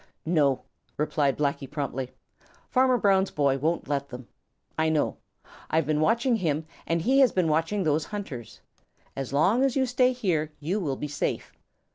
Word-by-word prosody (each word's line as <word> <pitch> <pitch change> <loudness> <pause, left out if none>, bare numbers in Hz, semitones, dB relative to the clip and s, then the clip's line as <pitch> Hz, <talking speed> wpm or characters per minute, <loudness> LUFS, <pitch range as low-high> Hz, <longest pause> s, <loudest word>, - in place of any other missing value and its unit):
"No," 150 -5 +2 0.3
replied 145 -2 +1
Blacky 140 -2 -1
promptly. 135 -3 -3 0.6
"Farmer 255 -1 +4
Brown's 195 -3 +3
boy 140 -2 +1
won't 165 +5 -1
let 140 -1 -2
them. 125 -1 -9 0.5
I 160 0 +1
know. 155 -2 0 0.5
I've 160 -1 +2
been 150 +1 +1
watching 235 +6 +2
him 160 -5 -1 0.2
and 165 0 0
he 265 +3 +3
has 260 -5 +6
been 180 -4 +1
watching 165 +6 +1
those 155 -1 +1
hunters. 145 - -7 0.5
As 135 -2 -4
long 185 - +3
as 270 -2 +1
you 265 -1 +2
stay 250 +1 +3
here, 170 -11 -1
you 175 +8 -1
will 145 -8 -2
be 150 - -4
safe. 145 - -3
160 Hz, 165 wpm, -27 LUFS, 145-205 Hz, 0.6 s, has